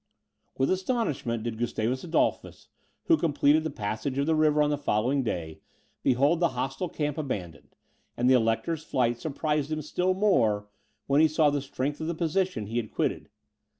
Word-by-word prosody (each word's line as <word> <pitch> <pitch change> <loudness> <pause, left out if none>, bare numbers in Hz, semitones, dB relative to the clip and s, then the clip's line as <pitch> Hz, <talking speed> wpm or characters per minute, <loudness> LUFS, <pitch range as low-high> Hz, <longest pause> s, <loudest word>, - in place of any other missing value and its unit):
With 135 - +1
astonishment 170 - -1
did 115 -1 -4
Gustavus 120 +1 -1
Adolphus, 170 - -1 0.3
who 330 - +4
completed 150 - +3
the 160 - -2
passage 110 +2 -3
of 140 - +1
the 160 - +2
river 155 -1 +3
on 150 - +1
the 145 - 0
following 130 +1 +1
day 85 -9 -4 0.4
behold 140 +7 +3
the 165 -8 0
hostile 135 +8 -2
camp 150 -1 -2
abandoned; 90 - -6 0.4
and 120 - +1
the 130 - +6
Elector's 125 +7 +1
flight 120 -5 0
surprised 150 +1 -2
him 155 -1 -2
still 180 +5 0
more, 110 - +2 0.4
when 140 +2 +3
he 160 - +6
saw 155 -1 +3
the 145 -1 -1
strength 140 +2 -3
of 160 - -3
the 170 - -2
position 170 - -1
he 115 +4 -4
had 110 -3 -2
quitted. - - -2
140 Hz, 175 wpm, -27 LUFS, 120-160 Hz, 0.4 s, the